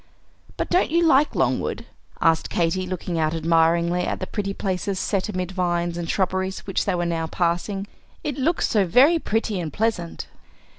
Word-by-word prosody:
"But - - -3
don't 360 - +3
you 335 +2 +3
like 295 -1 +4
Longwood?" - - 0 0.3
asked 165 -1 +2
Katy, 175 +2 0
looking 180 -2 -3
out 155 +1 +1
admiringly 165 +2 +2
at - - -2
the 185 - -3
pretty 200 0 -3
places 195 0 -2
set 195 +1 -1
amid 185 -2 -3
vines 175 -2 -1
and 170 -1 -4
shrubberies, 190 0 -1
which 195 - -1
they 195 - +1
were 175 0 -1
now 165 -1 -1
passing. 180 +4 -1 0.4
"It 290 - -2
looks 330 +6 +1
so 210 -3 +2
very 280 - +5
pretty 220 -6 -1
and 165 -3 -4
pleasant." 205 -3 -2
185 Hz, 170 wpm, -23 LUFS, 170-205 Hz, 0.4 s, very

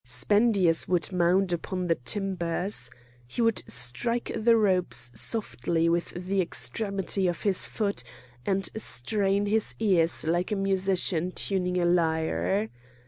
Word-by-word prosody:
Spendius 175 - +2
would 180 +1 -1
mount 180 +1 +1
upon 180 +2 -4
the 170 - +2
timbers. 180 +4 -1 0.4
He 125 - -8
would 230 -1 +2
strike 235 - 0
the 230 +1 +3
ropes 185 - +3
softly 165 - 0
with 170 +1 -1 0.2
the 195 +1 0
extremity 190 - -1
of 175 - -4
his 195 -3 +2
foot, 200 - -2 0.4
and 195 -1 -1
strain 200 - 0
his 215 +1 0
ears 175 -8 +1
like 175 +4 -1
a - - 0
musician 190 -3 0
tuning 180 -2 -1
a 175 - 0
lyre. 175 +4 0
185 Hz, 130 wpm, -26 LUFS, 170-200 Hz, 0.4 s, the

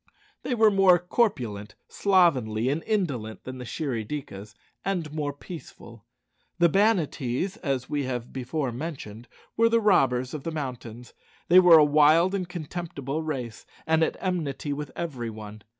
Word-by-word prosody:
They 250 - -2
were 220 -2 +5
more 195 -2 +5
corpulent, 125 - -1
slovenly, 130 - +2
and 150 +4 -1
indolent 140 - -2
than 130 0 -8
the 125 - -7
Shirry 125 -4 -3
dikas, 105 -6 -7 0.3
and 175 -6 -3
more 150 -2 -2
peaceful. 140 - -12 0.5
The 175 -1 +4
Banattees, 185 - 0
as 135 -5 -2
we 145 -2 -2
have 125 -2 -5
before 130 +1 -3
mentioned, 120 -5 -7 0.3
were 230 +1 +4
the 230 0 +3
robbers 130 - +2
of 155 - -5
the 165 - -4
mountains. 125 -6 -7 0.4
They 180 +2 +8
were 175 -3 +8
a 150 - +7
wild 155 +5 +4
and 185 -3 -3
contemptible 160 -4 -5
race, 130 -8 -5 0.2
and 160 0 +2
at - - -1
enmity 155 -6 -2
with 150 +1 -5
every 130 -9 -4
one. 105 -1 -10
145 Hz, 150 wpm, -26 LUFS, 125-175 Hz, 0.5 s, They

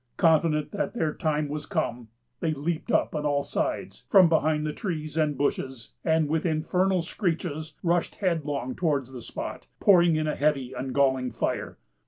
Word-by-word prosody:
Confident 160 -2 +3
that 205 - -3
their 160 -9 0
time 155 -1 0
was 150 +1 -5
come, 125 - -2 0.3
they 160 -2 0
leaped 155 +3 -2
up - - +2
on 150 -2 -2
all 145 -1 +1
sides, - - -3
from 190 -3 +7
behind 155 -1 +2
the 150 - -2
trees 155 -7 -4
and 150 -3 +1
bushes, 130 -3 -2
and, 160 -1 +2
with 160 +1 0
infernal 180 +3 +1
screeches, 165 -4 -3
rushed 175 0 +1
headlong 150 - -1
towards 145 -7 0
the 125 -2 -8
spot, - - -6
pouring 175 -4 +5
in 155 0 0
a 150 - -1
heavy 135 -3 0
and 130 0 -4
galling 130 -2 +2
fire. - - -3
155 Hz, 170 wpm, -27 LUFS, 145-165 Hz, 0.3 s, from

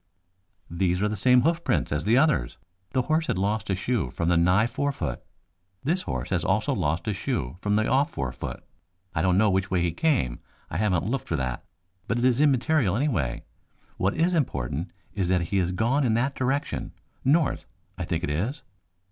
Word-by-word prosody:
"These 90 +1 0
are - - +3
the 105 - -2
same 125 +4 +4
hoofprints 170 +2 +1
as 75 +2 -1
the 115 +4 +4
others. 135 - +2 0.4
The 130 -2 +2
horse 155 +4 +1
had - - 0
lost 100 +1 -1
a 95 - +2
shoe 115 +5 -1
from 85 0 -1
the 90 - +4
nigh 90 +6 +4
fore 140 +4 -1
foot. - - -4 0.6
This 170 +6 +1
horse 65 - -4
also - - +1
has - - -3
lost 80 +5 -1
a 105 - +1
shoe 85 -5 -3
from 105 0 +1
the 110 +1 +2
off 140 +2 +3
fore 65 -2 -3
foot. - - -7 0.5
I 80 - 0
don't 90 +1 +3
know 105 0 +4
which 95 0 0
way 90 -2 +1
he 85 - +1
came, 85 - 0 0.3
I 80 - -2
haven't 90 -4 +1
looked 125 +4 -2
for 85 - -1
that, 65 -4 -3 0.4
but 115 - 0
it 120 - +1
is 130 +1 +3
immaterial 140 - +3
anyway. 110 - -1 0.5
What 95 +2 0
is 170 +3 +2
important 80 - -1 0.2
is 95 -3 -1
that 90 -1 +3
he 100 - 0
has 90 -2 +1
gone 120 +9 +1
in 115 -4 +2
that 130 +4 +1
direction 135 +2 -2 0.3
north, 150 +3 +2 0.3
I - - -4
think 85 +1 -2
it 90 - -1
is." 105 - -2
105 Hz, 200 wpm, -26 LUFS, 85-135 Hz, 0.6 s, same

